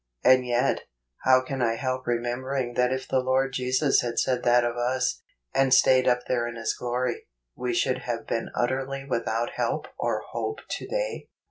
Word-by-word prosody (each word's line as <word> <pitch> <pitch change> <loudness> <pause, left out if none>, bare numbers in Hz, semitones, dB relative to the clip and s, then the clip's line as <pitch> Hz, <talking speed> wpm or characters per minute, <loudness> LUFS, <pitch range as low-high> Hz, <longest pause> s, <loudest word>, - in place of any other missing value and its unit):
And 130 -1 +5
yet, 120 0 +1 0.4
how 130 0 +6
can 130 0 -4
I 115 -1 +2
help 130 +1 -3
remembering 120 +2 -1
that 125 +1 +2
if 130 0 -3
the 130 - +2
Lord 130 +1 +1
Jesus 130 +3 +2
had 120 -1 -4
said 125 -1 +1
that 120 0 +4
of 120 0 -1
us, 125 +1 0 0.3
and 135 -1 +3
stayed 130 0 +5
up 125 -1 +3
there 120 -2 0
in 120 - -6
His 115 -1 -1
glory, 125 0 -2 0.3
we 125 -1 -2
should 130 +2 +1
have 120 -2 -4
been 115 - -2
utterly 135 +2 -1
without 115 -2 -1
help - - -1
or - - -1
hope 425 - -3
to - - -5
day - - -3
125 Hz, 180 wpm, -26 LUFS, 120-130 Hz, 0.4 s, how